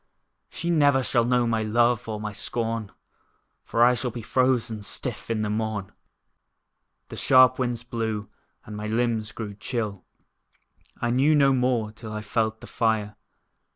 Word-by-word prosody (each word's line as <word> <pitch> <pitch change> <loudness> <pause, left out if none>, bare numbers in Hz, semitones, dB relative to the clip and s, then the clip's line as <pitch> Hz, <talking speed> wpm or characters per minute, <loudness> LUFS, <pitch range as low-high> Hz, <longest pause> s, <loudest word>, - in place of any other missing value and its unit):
She 170 +1 -3
never 145 -5 +4
shall 120 -2 +2
know 125 0 +2
my 115 -1 0
love, 120 +2 +2
or 105 -1 -3
my 105 0 -5
scorn, 115 -1 -3 0.7
For 115 - +2
I 125 +1 +6
shall 125 0 -2
be 120 -1 -7
frozen 125 -3 +1
stiff 115 +3 -5
in 110 -2 0
the 105 - -1
morn. 105 -2 -2 1.2
The - - -7
sharp 130 -1 +5
winds 120 -2 -1
blew, 110 -3 -3 0.4
and 105 - -8
my 105 +1 -4
limbs 110 -1 0
grew 105 -3 -6
chill. 105 -2 -4 1.0
I 120 - 0
knew 140 +5 +4
no 140 -2 +5
more 125 -4 +1
till 110 0 -10
I 105 0 -5
felt 110 0 -1
the - - -9
fire. 110 -2 0
115 Hz, 155 wpm, -25 LUFS, 110-125 Hz, 1.2 s, I